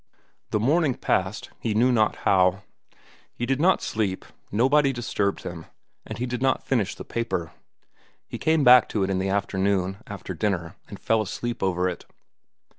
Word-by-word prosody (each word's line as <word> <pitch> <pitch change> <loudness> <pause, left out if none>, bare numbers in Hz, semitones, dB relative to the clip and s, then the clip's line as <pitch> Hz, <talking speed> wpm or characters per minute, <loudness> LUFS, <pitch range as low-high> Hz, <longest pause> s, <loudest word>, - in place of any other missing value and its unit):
The 105 - 0
morning 145 +3 +2
passed, 95 +3 -1
he 110 -3 -2
knew 125 +4 +4
not 110 -3 +2
how. 95 +1 +3 0.7
He 120 - -3
did 135 +3 0
not 185 +3 +3
sleep, 100 -4 -2 0.3
nobody 135 +6 +3
disturbed 115 -5 -2
him, 85 -2 -7 0.4
and - - -6
he 125 - -2
did 125 0 -4
not 130 0 +1
finish 115 -8 0
the - - -9
paper. 115 -8 -3 0.8
He - - -7
came 160 -1 +2
back 125 -2 +7
to 105 - 0
it 95 - -1
in 95 - 0
the 95 +1 -1
afternoon, 95 -1 0
after 100 -3 -6
dinner, 85 -3 -2
and - - -9
fell 110 -1 +1
asleep 120 +4 -4
over 90 -1 +1
it. 90 - -5
105 Hz, 170 wpm, -25 LUFS, 95-125 Hz, 0.8 s, back